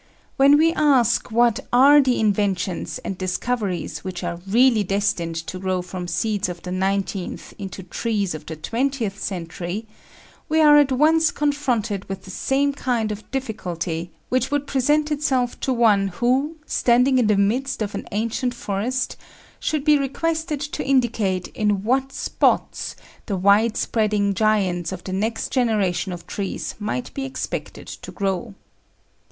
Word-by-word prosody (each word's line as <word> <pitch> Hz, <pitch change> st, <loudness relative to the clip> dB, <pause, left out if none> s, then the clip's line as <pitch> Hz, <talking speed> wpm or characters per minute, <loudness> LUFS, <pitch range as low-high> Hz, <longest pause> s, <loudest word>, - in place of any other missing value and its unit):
When 280 Hz, +2 st, +6 dB
we 325 Hz, +2 st, +4 dB
ask 270 Hz, -7 st, +3 dB
what 235 Hz, 0 st, +3 dB
are 280 Hz, +4 st, +7 dB
the 255 Hz, -2 st, +1 dB
inventions 200 Hz, -4 st, 0 dB
and 195 Hz, -, -3 dB
discoveries 190 Hz, +1 st, -2 dB
which 185 Hz, -1 st, -5 dB
are 170 Hz, -1 st, -3 dB
really 230 Hz, +1 st, +4 dB
destined 195 Hz, -4 st, -1 dB
to 185 Hz, -, -6 dB
grow 185 Hz, -1 st, -1 dB
from 180 Hz, 0 st, -6 dB
seeds 200 Hz, +3 st, -1 dB
of 175 Hz, -1 st, -7 dB
the 180 Hz, -, -5 dB
nineteenth 190 Hz, 0 st, -2 dB
into 190 Hz, -1 st, -6 dB
trees 200 Hz, 0 st, -2 dB
of 155 Hz, -, -8 dB
the 160 Hz, -, -5 dB
twentieth 230 Hz, -, -2 dB
century, 175 Hz, +3 st, -4 dB, 0.6 s
we 315 Hz, +1 st, +2 dB
are 295 Hz, -1 st, +7 dB
at 280 Hz, -2 st, +3 dB
once 315 Hz, +4 st, +4 dB
confronted 245 Hz, -10 st, -1 dB
with 195 Hz, 0 st, -5 dB
the 190 Hz, -, -10 dB
same 280 Hz, +8 st, +1 dB
kind 240 Hz, -6 st, -1 dB
of 210 Hz, +1 st, -7 dB
difficulty 175 Hz, -10 st, -4 dB, 0.2 s
which 255 Hz, +1 st, +1 dB
would 290 Hz, -1 st, 0 dB
present 295 Hz, +3 st, +1 dB
itself 265 Hz, -4 st, 0 dB
to 265 Hz, -, -1 dB
one 215 Hz, -5 st, +4 dB
who, 255 Hz, -, 0 dB
standing 250 Hz, +1 st, +3 dB
in 235 Hz, -, +3 dB
the 210 Hz, -2 st, +3 dB
midst 230 Hz, +5 st, +1 dB
of 205 Hz, -, -5 dB
an -, -, -5 dB
ancient 230 Hz, +4 st, -1 dB
forest, 240 Hz, +5 st, -2 dB, 0.4 s
should 300 Hz, -2 st, -1 dB
be 300 Hz, -2 st, +5 dB
requested 315 Hz, +2 st, -1 dB
to 295 Hz, 0 st, -3 dB
indicate 225 Hz, -8 st, +1 dB
in 205 Hz, -2 st, 0 dB
what 265 Hz, +4 st, +1 dB
spots -, -, 0 dB, 0.3 s
the 200 Hz, -4 st, -1 dB
wide 205 Hz, +4 st, +4 dB
spreading 210 Hz, -3 st, +1 dB
giants 190 Hz, -5 st, +1 dB
of 185 Hz, -2 st, -6 dB
the 185 Hz, -, -5 dB
next 220 Hz, +4 st, -2 dB
generation 210 Hz, -7 st, +1 dB
of 175 Hz, -1 st, -7 dB
trees 200 Hz, -2 st, -4 dB
might 215 Hz, +4 st, -3 dB
be 275 Hz, -, -4 dB
expected 270 Hz, 0 st, -5 dB
to -, -, -9 dB
grow. 190 Hz, -, -2 dB
220 Hz, 155 wpm, -22 LUFS, 190-265 Hz, 0.6 s, are